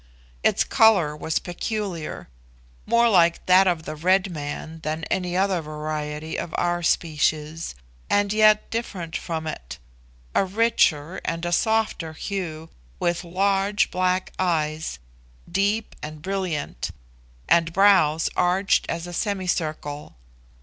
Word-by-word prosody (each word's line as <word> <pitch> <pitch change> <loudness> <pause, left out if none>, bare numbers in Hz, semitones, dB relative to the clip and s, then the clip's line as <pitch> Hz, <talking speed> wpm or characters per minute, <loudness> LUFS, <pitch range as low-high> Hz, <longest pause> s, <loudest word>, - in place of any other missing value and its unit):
Its - - +3
colour 195 -10 +4
was 155 +1 -2
peculiar, 180 -2 -4 0.6
more 235 0 +4
like 170 -6 +3
that 185 +1 +6
of 170 -3 +1
the 155 0 -6
red 185 +4 +2
man 155 +1 -6
than 155 +1 -3
any 180 -1 0
other 190 -2 +1
variety 150 0 -4
of 165 - -5
our 175 0 0
species, 155 - 0 0.3
and 205 0 +2
yet 215 0 +5
different 190 -8 -4
from 160 -2 -3
it 65 - -6 0.6
a - - +3
richer 190 -5 +2
and 165 +1 -3
a 175 - -1
softer 220 -5 +1
hue, 165 -3 -5 0.3
with 175 +1 0
large 195 +3 +1
black 185 0 0
eyes, 160 -3 -1 0.5
deep 205 +4 0
and 150 0 -8
brilliant, 185 - -3 0.6
and 165 0 +3
brows 170 -5 +4
arched 185 +2 +2
as 170 - -3
a 175 - -8
semicircle. 165 -6 -2
175 Hz, 120 wpm, -24 LUFS, 155-195 Hz, 0.6 s, that